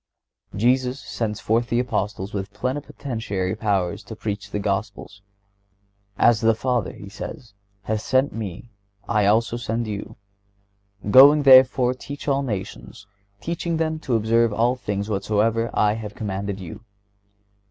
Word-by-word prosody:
(116) -, -, -6 dB, 0.2 s
Jesus 130 Hz, +1 st, -5 dB
sends 110 Hz, -5 st, -4 dB
forth 115 Hz, +2 st, 0 dB
the 120 Hz, -, +1 dB
Apostles 105 Hz, -5 st, -2 dB
with 100 Hz, -1 st, -4 dB
plenipotentiary 115 Hz, -5 st, -3 dB
powers 100 Hz, -5 st, -1 dB
to 110 Hz, -, -9 dB
preach 105 Hz, -1 st, -5 dB
the -, -, -3 dB
Gospel. 100 Hz, 0 st, -3 dB, 1.1 s
"As 115 Hz, -2 st, +4 dB
the 115 Hz, -1 st, +3 dB
Father," 125 Hz, -2 st, -1 dB
He 100 Hz, -, -11 dB
says, 105 Hz, +3 st, -9 dB, 0.3 s
"hath 110 Hz, 0 st, -2 dB
sent 130 Hz, +4 st, +1 dB
Me, 110 Hz, +1 st, -7 dB, 0.4 s
I 105 Hz, -3 st, +2 dB
also 115 Hz, +3 st, +2 dB
send 120 Hz, 0 st, -2 dB
you."(117) 100 Hz, -1 st, -10 dB
"Going 145 Hz, +4 st, +8 dB
therefore, 130 Hz, -2 st, +6 dB
teach 140 Hz, +3 st, -9 dB
all 140 Hz, -1 st, +2 dB
nations, 100 Hz, -4 st, -6 dB, 0.4 s
teaching 170 Hz, 0 st, -2 dB
them 160 Hz, -1 st, -1 dB
to 130 Hz, -6 st, -1 dB
observe 115 Hz, +1 st, +2 dB
all 120 Hz, +4 st, +1 dB
things 100 Hz, -5 st, -3 dB
whatsoever 110 Hz, +2 st, 0 dB
I 105 Hz, 0 st, +2 dB
have 105 Hz, -2 st, -7 dB
commanded 100 Hz, -1 st, -4 dB
you." 95 Hz, +4 st, -9 dB
110 Hz, 140 wpm, -23 LUFS, 100-125 Hz, 1.1 s, Going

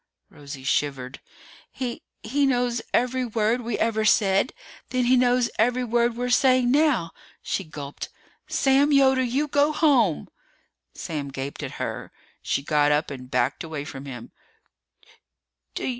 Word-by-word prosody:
Rosie 140 Hz, -2 st, -10 dB
shivered. 135 Hz, -2 st, -1 dB, 0.5 s
"He 245 Hz, -2 st, -5 dB, 0.2 s
he 275 Hz, +5 st, +1 dB
knows 245 Hz, -2 st, 0 dB
every 250 Hz, +1 st, +1 dB
word 230 Hz, +1 st, 0 dB
we 235 Hz, -2 st, -3 dB
ever 220 Hz, -1 st, 0 dB
said! 200 Hz, +1 st, +3 dB, 0.4 s
Then 255 Hz, -1 st, 0 dB
he 250 Hz, +2 st, +4 dB
knows 245 Hz, -1 st, +2 dB
every 245 Hz, +3 st, +2 dB
word 235 Hz, 0 st, +1 dB
we're 250 Hz, 0 st, -2 dB
saying 255 Hz, -1 st, +4 dB
now!" 275 Hz, -, +2 dB, 0.3 s
She 195 Hz, -, -2 dB
gulped. 145 Hz, -3 st, -8 dB, 0.4 s
"Sam 275 Hz, +2 st, +3 dB
Yoder, 265 Hz, -2 st, +4 dB
you 260 Hz, +4 st, 0 dB
go 290 Hz, +1 st, +2 dB
home!" 265 Hz, -, +2 dB, 0.7 s
Sam 145 Hz, -4 st, -5 dB
gaped 135 Hz, +1 st, -6 dB
at -, -, -5 dB
her. -, -, -5 dB, 0.3 s
She 140 Hz, -, -1 dB
got 150 Hz, 0 st, +2 dB
up 150 Hz, +1 st, +1 dB
and 125 Hz, -2 st, -8 dB
backed 125 Hz, +4 st, 0 dB
away 155 Hz, -3 st, -5 dB
from 135 Hz, -1 st, -8 dB
him. 120 Hz, -3 st, -9 dB
235 Hz, 140 wpm, -24 LUFS, -, 0.7 s, he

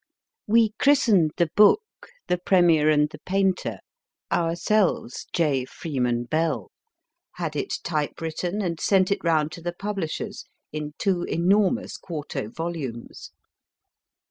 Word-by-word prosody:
We 225 Hz, 0 st, +4 dB
christened 215 Hz, -, +4 dB
the 170 Hz, -3 st, +1 dB
book 210 Hz, -, +6 dB, 0.4 s
The 180 Hz, -, 0 dB
Premier 175 Hz, -4 st, +4 dB
and 150 Hz, -1 st, +4 dB
the 150 Hz, -, -10 dB
Painter, 190 Hz, +1 st, 0 dB, 0.5 s
ourselves 170 Hz, -, 0 dB
J. 145 Hz, -6 st, +1 dB
Freeman 125 Hz, -4 st, -2 dB
Bell, 155 Hz, +5 st, -1 dB, 0.6 s
had 165 Hz, -4 st, -4 dB
it 145 Hz, -, -2 dB
type 155 Hz, -3 st, -2 dB
written, 175 Hz, +5 st, -3 dB
and 170 Hz, -3 st, -2 dB
sent 190 Hz, -1 st, +3 dB
it 200 Hz, -, -1 dB
round 155 Hz, -2 st, +2 dB
to 170 Hz, -, -9 dB
the 175 Hz, +1 st, -3 dB
publishers 195 Hz, -4 st, -4 dB, 0.3 s
in 150 Hz, 0 st, -5 dB
two 185 Hz, -3 st, 0 dB
enormous 200 Hz, +7 st, +1 dB
quarto 150 Hz, -, -5 dB
volumes. 150 Hz, -6 st, -6 dB
170 Hz, 120 wpm, -25 LUFS, 150-190 Hz, 0.6 s, book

